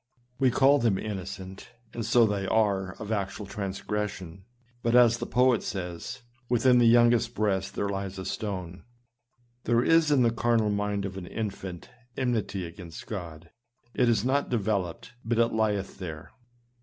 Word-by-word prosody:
We 135 -2 +4
call 135 +3 +4
them 115 -4 +2
inno 95 -1 -4
cent, 95 -1 -9 0.2
and 115 - -4
so 115 +2 +4
they 100 -2 -1
are 95 -3 +1
of 105 +1 -7
actual 100 -1 -2
transgression, 100 -2 -4 0.4
but 120 0 +1
as 120 -1 +6
the 120 - -4
poet 125 0 +3
says, 90 +6 -5
" 130 -1 -37
Within 125 +1 +4
the 120 - +5
youngest 120 0 +4
breast 95 -3 -1
there 100 - -1
lies 100 -1 -4
a 95 - -6
stone." 90 -4 -4 0.8
There 120 0 +3
is 165 0 +4
in 140 -4 +4
the 115 - +3
carnal 115 -2 +1
mind 100 -1 -1
of 95 0 -6
an 90 -2 -7
infant, 95 -4 -6 0.3
enmity 110 -7 -1
against 85 -1 -10
God; 85 -5 -7 0.4
it 120 - +2
is 115 -1 +2
not 140 +2 +1
developed, 105 -4 -2
but 115 +1 -1
it 115 0 +2
lieth 105 -3 -1
there. 80 -5 -7
105 Hz, 165 wpm, -27 LUFS, 95-120 Hz, 0.8 s, as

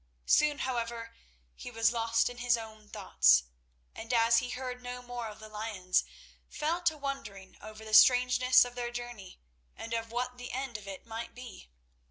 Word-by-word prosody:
Soon, 300 -1 +3
however, 235 -3 -3 0.4
he - - -9
was 225 0 +2
lost 230 0 +1
in 245 - -6
his 245 -1 +2
own 220 -2 -11
thoughts, 60 0 +4 0.5
and, 225 - -7
as 230 -1 +4
he 250 - -5
heard 250 0 -5
no 250 0 -7
more 245 -1 -5
of 210 - -9
the 215 - -10
lions, 210 -4 -1 0.5
fell 325 +4 -2
to 330 -3 +1
wondering 230 -10 -6
over 215 +1 -10
the 215 - -8
strangeness 250 +2 +6
of 245 - -8
their 245 -1 -4
journey 240 -6 -8 0.4
and 230 - -7
of 230 -1 -3
what 250 +1 -3
the 245 - -7
end 260 -2 -4
of 210 -2 -7
it 195 -1 -8
might 225 0 -7
be. 245 - -11
235 Hz, 180 wpm, -30 LUFS, 220-250 Hz, 0.5 s, strangeness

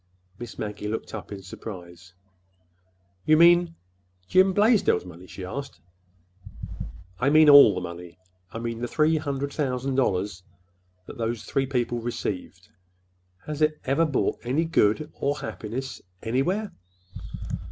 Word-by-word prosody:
Miss 120 -1 -8
Maggie 105 0 -5
looked 110 +1 -4
up 110 -2 -7
in 100 -1 -7
surprise. 90 -2 -10 1.1
"You 155 0 +4
mean—Jim 165 - +2
Blaisdell's 205 - +3
money?" 90 +1 -12
she 95 - -8
asked. 140 +9 -6 1.4
"I 130 - +2
mean 155 +1 +6
all 140 -9 +9
the 90 - -3
money—I 90 +2 -11
mean 115 0 -4
the 120 - -2
three 155 +4 +2
hundred 140 -2 -3
thousand 135 -2 -1
dollars 100 -7 0 0.6
that - - -11
those 115 -1 -2
three 135 -1 -1
people 120 -2 -1
received. 100 -5 -5 0.8
Has 150 0 -5
it 155 0 +2
ever 145 +5 +2
brought 140 - 0
any 140 +7 0
good 150 -1 +1
or 145 +1 -1
happiness—anywhere?" 130 - -3
120 Hz, 120 wpm, -25 LUFS, 95-150 Hz, 1.4 s, all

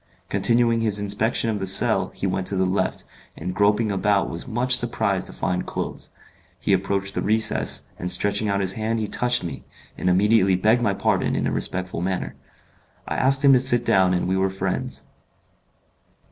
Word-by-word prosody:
Continuing 115 -1 +2
his 110 -3 +1
inspection 105 +3 -1
of 105 - -3
the 95 - -4
cell 95 - +4
he - - -4
went 95 0 -2
to 100 - -1
the 95 0 +1
left, 95 +2 -1 0.3
and 90 +3 -5
groping 105 +3 +1
about 100 +1 0
was 85 - -7
much 125 +2 0
surprised 110 -6 +1
to - - -4
find 90 -1 -3
clothes. - - -5 0.5
He - - 0
approached 100 +1 -1
the - - -2
recess, 110 +1 +1 0.2
and 90 - -3
stretching 100 +3 +1
out 100 0 0
his 95 -1 +2
hand 110 +2 -2
he 110 - -2
touched 125 +2 0
me, 85 - -7 0.4
and - - 0
immediately 95 +1 +3
begged 110 +6 +2
my 100 -4 0
pardon - - 0
in - - -1
a - - -1
respectful 95 -2 -3
manner. 95 0 -3 0.7
I - - -3
asked 135 +2 +3
him 135 - +7
to 130 - +5
sit 120 -2 +2
down 95 -3 +3
and 90 - -1
we 95 - 0
were 95 0 +1
friends. 95 - -4
100 Hz, 190 wpm, -22 LUFS, 95-115 Hz, 0.7 s, him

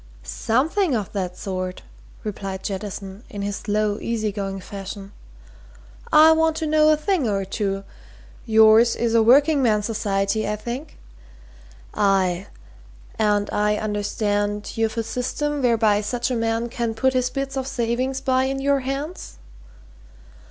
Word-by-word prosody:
"Something 280 - 0
of 210 -4 -3
that 185 -3 -4
sort," 185 -1 -4 0.4
replied 195 -2 -5
Jettison 195 +1 -6
in 205 -1 -5
his 200 0 -2
slow, 210 0 -1
easy 220 -2 -2
going 195 -1 -4
fashion. 195 +1 -8 1.0
"I 310 +1 +8
want 320 0 +3
to 320 - -2
know 310 0 +4
a 310 - +4
thing 320 - 0
or 195 -1 -1
two. 195 0 -2 0.6
Yours 220 +1 +6
is 230 -1 0
a 230 - +5
working 280 +6 +5
man's 210 -4 +2
society, 205 -1 -1
I 210 - 0
think? 240 +8 -7 1.0
Aye 195 -2 +1 0.7
and 205 -1 +2
I 210 0 +1
understand 205 0 -1
you've 225 0 -1
a 230 - 0
system 285 +5 -2
whereby 225 -4 +3
such 240 +4 -2
a - - 0
man 230 0 0
can 235 -2 -3
put 260 +3 +2
his 250 -1 +1
bits 275 +1 -4
of 265 -1 -2
savings 255 +2 -1
by 260 0 +2
in 270 0 -2
your 280 0 +2
hands?" 275 +6 -5
225 Hz, 145 wpm, -23 LUFS, 205-260 Hz, 1.0 s, I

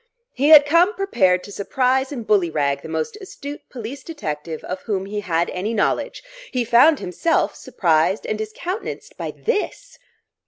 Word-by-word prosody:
He 275 +3 +1
had 300 -2 +10
come 340 +8 +4
prepared 190 - +2
to 205 - -10
surprise 260 +6 0
and 240 -6 -5
bully 200 -6 +3
rag 140 -3 0
the - - -9
most 160 - -3
astute 290 -6 -8
police 250 +2 -7
detective 155 - -5
of 185 0 -5
whom 190 -2 -1
he 205 +1 -4
had 170 -4 -1
any 205 +5 -3
knowledge; 210 - -1 0.3
he 250 -3 0
found 255 +7 +6
himself 310 - 0
surprised 185 -5 +1
and - - -1
discountenanced 360 - -5
by - - -5
this...! 480 +2 -3
225 Hz, 160 wpm, -21 LUFS, 180-295 Hz, 0.3 s, had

